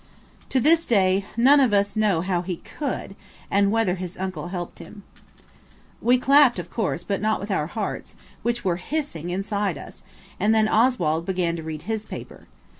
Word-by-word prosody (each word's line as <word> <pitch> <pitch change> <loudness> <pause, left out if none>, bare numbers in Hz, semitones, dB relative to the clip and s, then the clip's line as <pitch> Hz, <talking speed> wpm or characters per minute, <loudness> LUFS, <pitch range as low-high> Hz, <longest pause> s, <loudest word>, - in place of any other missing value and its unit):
To 265 - +2
this 325 +5 +4
day 195 -3 +3
none 270 +5 +6
of 250 -7 +4
us 200 0 +1
know 210 -6 +2
how 180 -1 0
he 180 0 -3
could, 255 - -5 0.4
and 200 0 +3
whether 225 -5 +2
his 180 -1 -6
uncle 185 -4 -4
helped 175 -1 -6
him. 195 +4 -11 1.0
We 245 +2 +4
clapped, 275 -1 +5
of 175 -1 -6
course, 190 -6 -2
but 200 0 -2
not 215 0 +1
with 200 +2 -5
our 150 -6 0
hearts, 215 +4 -5 0.3
which 240 -2 -2
were 175 -2 +1
hissing 180 - -4
inside 195 -1 -1
us, - - -11 0.4
and 215 +2 +3
then 215 -1 +4
Oswald 185 -9 +2
began 180 -3 0
to - - -5
read 155 -1 -6
his 220 +2 -3
paper. - - -9
200 Hz, 180 wpm, -24 LUFS, 175-225 Hz, 1.0 s, none